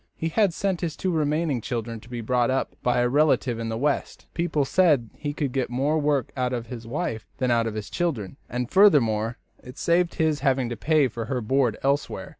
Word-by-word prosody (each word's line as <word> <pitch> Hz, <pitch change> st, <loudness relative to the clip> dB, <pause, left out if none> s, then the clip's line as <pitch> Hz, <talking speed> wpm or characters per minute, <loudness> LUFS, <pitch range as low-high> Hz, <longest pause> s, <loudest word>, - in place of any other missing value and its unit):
He 165 Hz, -, -2 dB
had 200 Hz, +3 st, +2 dB
sent 185 Hz, +1 st, -2 dB
his 165 Hz, -3 st, -2 dB
two 185 Hz, -, -1 dB
remaining 150 Hz, -4 st, 0 dB
children 115 Hz, 0 st, -4 dB
to 115 Hz, -, -16 dB
be 120 Hz, -1 st, -5 dB
brought 120 Hz, +2 st, +1 dB
up 130 Hz, +1 st, -1 dB
by 125 Hz, 0 st, +2 dB
a 120 Hz, -, +3 dB
relative 135 Hz, -3 st, +2 dB
in 115 Hz, 0 st, -3 dB
the 110 Hz, -, -2 dB
West. 145 Hz, +3 st, -1 dB
People 165 Hz, -4 st, 0 dB
said 145 Hz, -8 st, +3 dB
he 145 Hz, -, -4 dB
could 145 Hz, -2 st, -2 dB
get 130 Hz, -1 st, -1 dB
more 140 Hz, +6 st, +1 dB
work 145 Hz, -4 st, 0 dB
out 125 Hz, -1 st, -1 dB
of 120 Hz, -2 st, -3 dB
his 115 Hz, -1 st, -8 dB
wife 130 Hz, -4 st, -3 dB
than 125 Hz, -1 st, 0 dB
out 115 Hz, -1 st, +2 dB
of 110 Hz, -, -4 dB
the 110 Hz, -, -3 dB
children, 135 Hz, -, -3 dB
and, 125 Hz, 0 st, -2 dB
furthermore, 120 Hz, -, +4 dB, 0.3 s
it 125 Hz, +1 st, -11 dB
saved 170 Hz, +1 st, +1 dB
his 155 Hz, -2 st, +1 dB
having 135 Hz, -3 st, +1 dB
to 120 Hz, -, -3 dB
pay 150 Hz, +4 st, +2 dB
for 115 Hz, -1 st, -5 dB
her 125 Hz, +2 st, -2 dB
board 125 Hz, 0 st, +1 dB
elsewhere. 140 Hz, +1 st, -1 dB
130 Hz, 220 wpm, -25 LUFS, 120-155 Hz, 0.3 s, furthermore